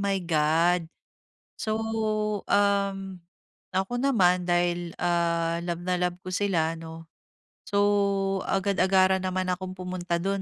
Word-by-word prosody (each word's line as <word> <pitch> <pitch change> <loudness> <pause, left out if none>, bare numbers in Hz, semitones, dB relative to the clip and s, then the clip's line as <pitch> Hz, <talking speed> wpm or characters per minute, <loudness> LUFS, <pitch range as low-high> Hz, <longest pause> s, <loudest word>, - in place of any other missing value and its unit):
my 200 -1 0
God. 165 +2 +2 0.7
So, 215 - -1 0.7
uhm, 200 -2 +1 0.5
ako 190 +3 -1
naman 185 -10 +3
dahil, 175 -1 0
ah, 170 -1 +1
love 175 -1 -3
na 180 0 0
love 180 0 -1
ko 185 - -5
sila, 180 -4 +1
'no. 165 0 -10 0.6
So 200 - +1 0.7
agad-agaran 190 -1 +3
naman 185 0 -1
akong 185 +1 -4
pumunta 180 -1 -3
do'n 195 +1 -1
180 Hz, 115 wpm, -26 LUFS, 170-195 Hz, 0.7 s, naman